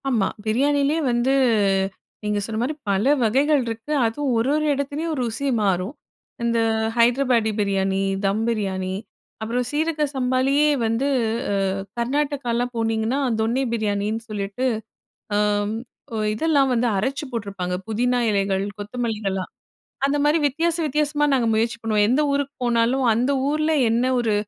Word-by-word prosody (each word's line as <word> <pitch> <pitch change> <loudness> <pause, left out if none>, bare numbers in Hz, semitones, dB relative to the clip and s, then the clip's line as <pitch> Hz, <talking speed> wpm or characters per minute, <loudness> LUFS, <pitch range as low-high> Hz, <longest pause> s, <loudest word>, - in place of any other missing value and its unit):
ஆமா, 225 -7 +2 0.2
பிரியாணிலயே 285 +6 +2
வந்து, 240 +3 +2 0.9
நீங்க 210 0 0
சொன்ன 220 0 -4
மாரி 260 +6 -1 0.2
பல 195 +1 +2 0.2
வகைகள் 275 +6 +3
இருக்கு. 230 +5 -5
அதுவும் 260 +5 -1
ஒரு 230 +4 +1
ஒரு 305 0 0
எடத்துலேயும் 285 +4 -2
ருசி 240 +4 -2
மாறும். 190 +2 0 0.5
இந்த 235 0 +1 0.4
ஹைதராபாடி 240 -1 +3
பிரியாணி, 195 -1 +1 0.3
தம் 200 +3 +1
பிரியாணி, 190 -5 -1 0.5
அப்புறம் 235 +3 -1
சீரக 310 +1 0
சம்பாலயே 265 +3 +2 0.2
வந்து 230 +5 0 0.4
அ - - +1 0.4
கர்நாடகாலாம் 250 -1 -1
போனீங்கன்னா, 225 +3 0 0.2
தொன்னி 235 +5 +1
பிரியாணின்னு 215 0 -1
சொல்லிட்டு, 205 +4 -3 0.7
ஆம், 205 0 +1 0.4
ஒ - - -2 0.2
இதெல்லாம் 280 +2 +2
வந்து 240 0 +1
அரைச்சி 270 +8 -2
போட்ருப்பாங்க. 200 -6 -4
புதினா 245 +3 +1
இலைகள் 195 -1 0 0.2
கொத்தமல்லிகள்லாம். 210 -3 -3 0.5
அந்த 280 +1 +1
மாரி 300 +2 +4
வித்தியாச 330 +4 0
வித்தியாசமா, 295 +1 +1
நாங்க 245 -4 +2
முயற்சி 230 +2 0
பண்ணுவோம். 215 -2 +2
எந்த 260 +5 +3
ஊருக்கு 280 0 -1
போனாலும் 240 +2 +2
அந்த 245 +5 +1 0.2
ஊர்ல 305 +1 +1 0.2
என்ன 235 +2 +2
ஒரு 225 -3 +1
235 Hz, 130 wpm, -23 LUFS, 215-275 Hz, 0.9 s, மாரி